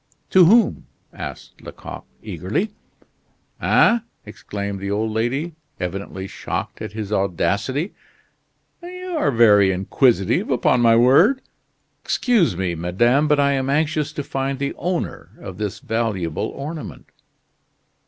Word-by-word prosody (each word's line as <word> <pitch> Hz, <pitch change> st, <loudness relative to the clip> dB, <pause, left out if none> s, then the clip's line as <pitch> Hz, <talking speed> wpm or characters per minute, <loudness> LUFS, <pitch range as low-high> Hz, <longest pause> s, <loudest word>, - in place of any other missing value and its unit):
"To 185 Hz, -2 st, +7 dB
whom?" 225 Hz, +7 st, +3 dB, 0.3 s
asked -, -, -9 dB
Lecoq, -, -, -9 dB, 0.2 s
eagerly. -, -, -2 dB, 0.9 s
"Eh?" 235 Hz, -, +4 dB, 0.3 s
exclaimed 100 Hz, -1 st, -6 dB
the 100 Hz, +1 st, -4 dB
old 110 Hz, +2 st, -1 dB
lady, 130 Hz, +10 st, -1 dB, 0.3 s
evidently 95 Hz, +1 st, -5 dB
shocked -, -, -5 dB
at -, -, -6 dB
his 105 Hz, -1 st, -4 dB
audacity, 100 Hz, -, -1 dB, 0.9 s
"you 365 Hz, 0 st, -6 dB
are 305 Hz, -, +1 dB
very 105 Hz, -6 st, +5 dB
inquisitive 95 Hz, +2 st, +1 dB
upon 120 Hz, -, +2 dB
my 115 Hz, -1 st, +5 dB
word!" 155 Hz, -, +5 dB, 0.6 s
"Excuse 210 Hz, -, +2 dB
me, 90 Hz, -2 st, -1 dB
madame, 120 Hz, -, +2 dB
but 150 Hz, -1 st, +3 dB
I 140 Hz, 0 st, +3 dB
am 135 Hz, -1 st, -1 dB
anxious 155 Hz, +1 st, 0 dB
to 145 Hz, -, -4 dB
find 135 Hz, 0 st, -2 dB
the 140 Hz, +1 st, -2 dB
owner 175 Hz, +2 st, -4 dB
of 95 Hz, 0 st, -9 dB
this 105 Hz, -3 st, -3 dB
valuable 105 Hz, -8 st, -2 dB
ornament." 150 Hz, +3 st, -8 dB
120 Hz, 125 wpm, -21 LUFS, 100-150 Hz, 0.9 s, To